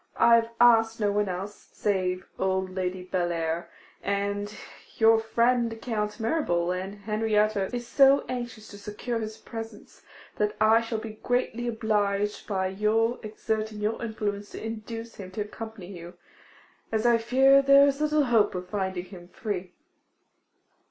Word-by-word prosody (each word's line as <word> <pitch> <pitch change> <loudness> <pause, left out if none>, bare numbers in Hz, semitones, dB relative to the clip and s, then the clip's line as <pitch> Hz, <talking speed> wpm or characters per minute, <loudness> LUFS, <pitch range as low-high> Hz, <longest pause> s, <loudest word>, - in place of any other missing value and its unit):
I 235 - +6
have 230 0 0
asked 225 -1 +5
no 205 -2 +2
one 205 -1 0
else, 190 +3 -6
save 185 -3 -1
old 190 0 0
Lady 185 0 -3
Bellair, 170 -2 -1 0.3
and 200 +1 -2 0.5
your 225 0 +6
friend 230 +1 +1
Count 210 -2 -3
Mirabel; 180 - 0
and 190 +2 -4
Henrietta 215 -1 +1
is 240 -1 -4
so 275 +2 +5
anxious 240 -3 -5
to 205 - -11
secure 210 +3 -4
his 215 0 -5
presence, 225 -2 -9 0.4
that 210 0 0
I 220 +1 +5
shall 230 0 -3
be 220 -1 -8
greatly 245 -1 -1
obliged 210 -3 0
by 190 -3 0
your 220 +4 +1
exerting 215 0 -3
your 210 +2 -2
influence 205 -2 -3
to - - -7
induce 225 +1 -6
him 190 -2 -8
to 210 - -3
accompany 210 -2 -7
you, 175 +1 -10 0.8
as 220 +1 0
I 235 -1 +5
fear 265 +4 +5
there 275 0 +7
is 280 +1 0
little 305 0 +3
hope 230 -7 +3
of 180 0 -5
finding 190 -3 -2
him 180 -2 -12
free. 185 -2 -5
215 Hz, 150 wpm, -27 LUFS, 200-230 Hz, 0.8 s, there